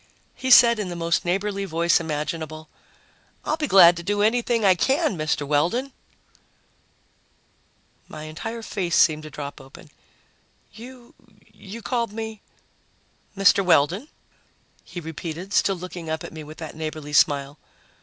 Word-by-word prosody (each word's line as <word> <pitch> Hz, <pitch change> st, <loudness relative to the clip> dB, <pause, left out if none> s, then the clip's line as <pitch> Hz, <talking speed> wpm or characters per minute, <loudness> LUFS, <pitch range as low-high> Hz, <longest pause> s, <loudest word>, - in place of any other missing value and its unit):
He 260 Hz, -, -4 dB
said 235 Hz, -3 st, +7 dB
in 200 Hz, -3 st, -3 dB
the 175 Hz, -, -5 dB
most 170 Hz, 0 st, -1 dB
neighborly 200 Hz, +3 st, -1 dB
voice 170 Hz, -2 st, +2 dB
imaginable, 155 Hz, 0 st, -5 dB, 0.8 s
"I'll 310 Hz, -, 0 dB
be 310 Hz, -2 st, -3 dB
glad 175 Hz, -5 st, +7 dB
to -, -, -5 dB
do 205 Hz, +3 st, 0 dB
anything 230 Hz, 0 st, +1 dB
I 190 Hz, -, +6 dB
can, 265 Hz, -, +1 dB
Mr. 155 Hz, -2 st, -1 dB
Weldon." 175 Hz, -, 0 dB, 2.1 s
My 155 Hz, -, -9 dB
entire 225 Hz, +9 st, -6 dB
face 185 Hz, -6 st, -2 dB
seemed 155 Hz, -1 st, +4 dB
to 155 Hz, -, -9 dB
drop 145 Hz, -2 st, -8 dB
open. 135 Hz, 0 st, -15 dB, 0.8 s
"You 240 Hz, +2 st, -13 dB, 0.4 s
you 210 Hz, +2 st, -10 dB
called 235 Hz, -4 st, -2 dB
me 220 Hz, -1 st, -6 dB, 0.5 s
" -, -, -37 dB
"Mr. 195 Hz, 0 st, +4 dB
Weldon," 180 Hz, -, +2 dB, 0.8 s
he 175 Hz, -, -8 dB
repeated, 165 Hz, +3 st, -7 dB
still 195 Hz, -, +2 dB
looking 175 Hz, -2 st, -8 dB
up 160 Hz, 0 st, -3 dB
at -, -, -9 dB
me 160 Hz, -1 st, -8 dB
with 155 Hz, +1 st, -12 dB
that 160 Hz, -2 st, -8 dB
neighborly 155 Hz, -2 st, -6 dB
smile. 145 Hz, 0 st, +2 dB
175 Hz, 145 wpm, -23 LUFS, 155-215 Hz, 2.1 s, said